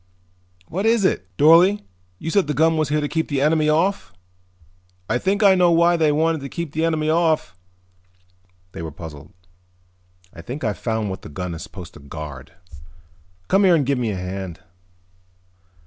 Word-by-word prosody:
"What 195 +6 -2
is 225 -3 +3
it?" 95 - 0
"Dorle, 170 +7 +5 0.3
you 160 - -5
said 200 -4 +2
the 150 - -2
gun 160 +1 +3
was 155 -3 0
here 150 0 +1
to 145 - -1
keep 160 +2 -2
the 140 -2 -1
enemy 155 +2 +2
off. 180 +6 0 1.0
I 120 +3 0
think 200 +8 0
I 195 -1 +7
know 180 -2 +4
why 170 +1 +4
they 160 -3 +2
wanted 160 +1 +1
to 140 - -6
keep 170 -1 -5
the 160 +2 -2
enemy 160 -2 0
off." 160 - +1 1.2
They - - -8
were 80 - -5
puzzled. 75 -2 -10 1.0
"I - - -10
think 135 +4 -7
I've 105 -4 -2
found 110 -3 -2
what 95 - -6
the - - -10
gun 90 +4 -5
is 80 - -7
supposed 90 -4 -10
to - - -13
guard. 70 -1 -9 0.9
Come 195 +2 +3
and 170 -6 +4
give 140 -1 0
me 120 -3 -1
a 105 - -2
hand." 95 -1 -6
150 Hz, 180 wpm, -21 LUFS, -, 1.2 s, I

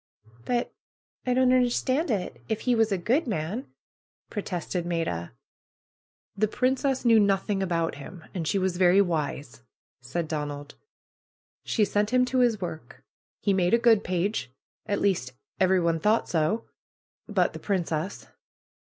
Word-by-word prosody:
"But 240 -1 -1 0.5
I 250 - +2
don't 255 0 +4
understand 255 +4 +2
it, 200 -6 -2
if 220 -1 -1
he 250 - +2
was 225 -2 +2
a 195 - +2
good 245 - +1
man," 210 - -3 0.6
protested 180 -3 -3
Maida. 165 - -2 1.0
"The 215 +2 +2
princess 260 +3 0
knew 230 -2 +6
nothing 200 0 +1
about 170 -3 0
him, 165 +4 -10
and 170 -5 -3
she 200 - +1
was 185 -2 0
very 185 +1 +5
wise," 150 -8 -1 0.4
said 145 +7 -3
Donald. 145 -2 -4 0.9
"She 215 - +2
sent 205 +1 0
him 250 +1 +3
to 255 +1 0
his 240 -4 +3
work. 170 -4 -7 0.4
He 200 - +3
made 185 +2 +3
a - - +4
good 230 -3 +4
page. 185 - -1 0.4
At 205 -1 -1
least, 175 -11 0 0.3
everyone 180 -3 +3
thought 215 +6 +2
so 180 +7 0 0.3
— - - - 0.3
but - - +1
the - - -7
princess." 180 -2 -2
195 Hz, 145 wpm, -27 LUFS, 170-230 Hz, 1.0 s, knew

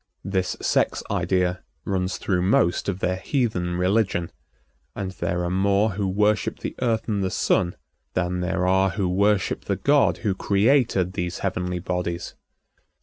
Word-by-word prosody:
This 95 -2 -1
sex - - +1
idea 90 -1 0 0.2
runs 95 -1 -1
through 90 -3 0
most 90 0 +2
of 95 0 -3
their 90 +1 0
heathen 95 -6 -1
religion, 90 -2 +1 0.6
and 95 -2 -3
there 90 -1 -2
are 85 - -1
more 100 +3 +2
who 100 +1 -2
worship 105 +1 +1
the - - -4
Earth 115 -3 0
and 100 -3 0
the 95 - 0
Sun 90 -1 +1 0.4
than 90 0 0
there 90 0 -1
are 95 +1 +3
who 95 0 -1
worship 100 +2 +1
the - - 0
God - - +3
who 100 - +2
created 100 -2 +2
these 90 -2 -3
heavenly 90 -1 -1
bodies. 90 -1 -3
95 Hz, 150 wpm, -24 LUFS, 90-100 Hz, 0.6 s, are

